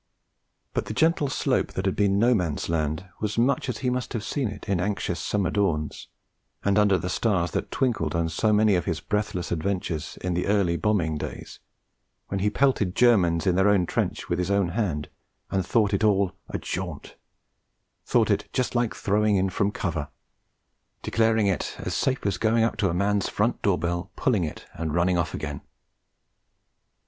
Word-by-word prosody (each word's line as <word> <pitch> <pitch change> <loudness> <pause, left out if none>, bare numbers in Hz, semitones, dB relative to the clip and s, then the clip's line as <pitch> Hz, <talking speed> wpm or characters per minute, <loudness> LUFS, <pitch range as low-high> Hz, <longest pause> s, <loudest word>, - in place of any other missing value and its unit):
But - - -2
the 110 - -5
gentle 160 0 +3
slope - - 0
that 95 - -3
had 95 - +1
been 100 -1 +2
No 120 +4 +4
Man's 85 -10 -1
Land 80 +2 -1
was 105 0 -2
much 130 +3 +2
as 125 - -2
he 125 - +2
must 125 +1 -3
have 115 -3 -3
seen 135 +1 -1
it 105 -1 -8
in 95 -3 +1
anxious 100 +3 -1
summer 100 -3 0
dawns, 80 -8 -1 0.6
and 100 +1 +3
under 100 -2 +4
the 90 - -4
stars 90 -1 0
that - - -2
twinkled 110 - 0
on 85 0 +1
so 95 +7 +1
many 105 0 +4
of 90 -3 +1
his - - -1
breathless 105 -4 -2
adventures 85 -2 -2
in 90 -1 -1
the 90 +2 -1
early 100 -4 +2
bombing 85 -6 0
days, - - -7 0.7
when 100 - -2
he 105 +2 +2
pelted 105 -6 +1
Germans 95 -9 +4
in 95 - +3
their 95 +3 +4
own 100 -3 +3
trench - - -2
with 85 - -1
his 90 +1 -1
own 100 -3 +2
hand, 85 -7 -1 0.4
and 95 -1 +1
thought 105 +2 +2
it - - +1
all 100 -3 +3 0.2
'a - - -2
jaunt'; - - -5 0.9
thought - - +2
it - - 0
'just 130 - -1
like 120 -2 0
throwing 105 +1 +2
in 95 0 +1
from 100 +2 +1
cover'; 85 -7 -3 1.0
declared 115 0 +2
it 100 -3 0
'as - - -4
safe 130 -4 0
as 95 -3 0
going 115 0 +3
up 115 - +1
to 100 - +1
a - - -1
man's 100 +1 +1
front 110 +4 0
door 100 -3 +2
bell 85 +2 -2
pulling 115 -10 +1
it 75 - -7
and 80 -1 -3
running 90 0 +2
off 80 -2 -1
again!' 75 -2 -5
100 Hz, 190 wpm, -25 LUFS, 85-105 Hz, 1.0 s, No